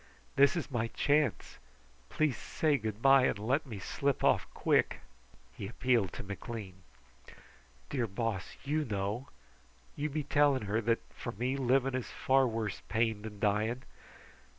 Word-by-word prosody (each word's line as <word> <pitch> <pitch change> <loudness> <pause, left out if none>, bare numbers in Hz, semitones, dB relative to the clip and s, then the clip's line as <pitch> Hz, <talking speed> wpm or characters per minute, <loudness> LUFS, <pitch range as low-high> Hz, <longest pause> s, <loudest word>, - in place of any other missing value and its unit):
This 140 +5 +5
is 160 -4 -3
my 115 -2 0
chance. 145 - 0 0.5
Please 155 -5 +1
say 145 - 0
good 110 0 -5
bye, 135 -1 +7
and - - -1
let 130 +9 0
me 110 -5 -6
slip 140 +8 -1
off - - +3
quick!" - - +1 0.5
He 100 - -5
appealed 115 -4 +1
to - - -6
McLean. 100 -1 -7 1.1
"Dear 125 -4 0
Boss, 105 -1 -3
you 150 +3 0
know! 105 +2 -3 0.7
You 150 +1 -2
be 150 +1 -2
telling 145 -3 +3
her 105 +3 0
that, 115 +1 +1
for - - -6
me, 125 +6 -1
living 135 0 +2
is 130 -2 -3
far 135 0 +3
worse 110 -3 -3
pain 110 -1 +1
than 105 -1 -8
dying. 110 +4 +1
120 Hz, 150 wpm, -32 LUFS, 105-135 Hz, 1.1 s, bye